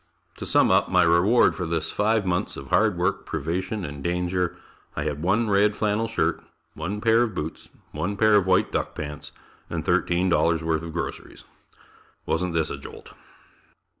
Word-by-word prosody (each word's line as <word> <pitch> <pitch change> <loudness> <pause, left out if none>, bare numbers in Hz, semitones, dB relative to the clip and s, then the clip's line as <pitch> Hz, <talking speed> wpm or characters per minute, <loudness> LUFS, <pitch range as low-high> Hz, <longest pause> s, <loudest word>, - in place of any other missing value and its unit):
To - - -6
sum - - +4
up - - +3
my - - +4
reward 85 +8 +4
for 90 - -4
this 80 -1 -2
five 110 0 +1
months 90 -1 -1
of - - -9
hard 105 -4 +3
work, 100 +3 0
privation 90 +6 -3
and 70 -1 -7
danger, 90 0 -1 0.4
I 75 - -2
had 75 -1 -3
one 105 +7 +1
red 105 +1 +3
flannel 110 +1 0
shirt, 115 - -1 0.3
one 95 +7 -4
pair 115 +1 +4
of 115 -5 -1
boots, 80 -1 -6 0.2
one 85 +7 -3
pair 110 0 +4
of 100 -2 +3
white 95 0 +3
duck - - -2
pants 75 -1 -7 0.4
and - - -4
$13 85 -2 +2
worth 80 -1 0
of 85 0 -7
groceries. 85 - -6 0.8
Wasn't 85 +1 -1
this 80 -1 0
a - - -5
jolt? - - -11
90 Hz, 170 wpm, -24 LUFS, 80-105 Hz, 0.8 s, sum